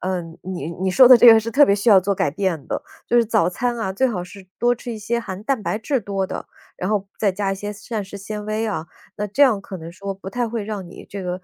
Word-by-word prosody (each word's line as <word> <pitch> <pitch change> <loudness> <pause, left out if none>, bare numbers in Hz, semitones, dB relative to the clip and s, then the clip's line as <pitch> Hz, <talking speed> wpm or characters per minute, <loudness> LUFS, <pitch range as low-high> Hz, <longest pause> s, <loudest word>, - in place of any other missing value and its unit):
嗯， 175 -3 -4
你 175 -4 -5
你 185 +2 -2
说 255 +6 +7
的 250 -1 +9
这 - - +7
个 225 - +8
是 220 +1 -3
特 285 +5 +6
别 200 - +4
需 210 +3 +2
要 195 - +8
做 200 +2 0
改 145 - 0
变 170 -4 -2
的。 - - -3 0.2
就 - - -2
是 235 - +3
早 210 -6 +2
餐 240 +5 -2
啊， 190 -4 -2
最 260 +7 +2
好 180 -7 -3
是 190 0 -13
多 240 +1 +3
吃 240 +1 -8
一 225 - -5
些 235 +3 -2
含 195 -2 -7
蛋 260 -4 0
白 - - -1
质 245 +4 -1
多 195 -2 -2
的， - - -6 0.3
然 185 - -2
后 200 -2 0
再 205 -3 +2
加 195 +1 -2
一 - - -2
些 205 +2 -5
膳 215 +1 -5
食 200 +1 -9
纤 210 +1 -6
维 215 +1 -1
啊， 170 -7 -3 0.3
那 210 - -2
这 210 +8 +1
样 240 -8 +4
可 195 -1 -8
能 165 -1 -9
说 195 +2 -5
不 190 0 -9
太 245 0 -1
会 225 -2 -3
让 200 -4 -5
你 180 - -12
这 200 -1 -6
个， 180 0 -4
200 Hz, 305 characters per minute, -21 LUFS, 190-225 Hz, 0.3 s, 的